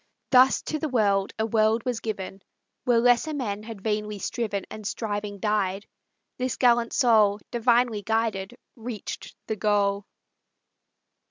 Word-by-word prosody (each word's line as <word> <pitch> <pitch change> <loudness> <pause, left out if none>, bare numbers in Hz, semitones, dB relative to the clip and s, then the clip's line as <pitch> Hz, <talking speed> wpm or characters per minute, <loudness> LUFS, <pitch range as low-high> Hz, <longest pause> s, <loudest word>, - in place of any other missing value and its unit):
Thus 260 0 +5
to 310 - -3
the 310 - -2
world 200 -5 +2
a 220 - 0
world 220 0 +2
was 245 -3 -1
given. 195 -3 -5 0.4
Where 245 -2 +4
lesser 245 +6 +3
men 210 -7 -3
had 220 -2 -9
vainly 210 -1 -2
striven, 205 -1 -3
And 215 -2 -6
striving 205 -2 -3
died, 205 -2 0 0.5
this 255 -1 -1
gallant 240 -2 +3
soul, 215 -5 +4
Divinely 240 -2 +2
guided, 220 0 -1 0.2
reached 230 -3 -7
the 220 - -2
goal. 205 -1 +1
220 Hz, 135 wpm, -26 LUFS, 205-240 Hz, 0.5 s, Thus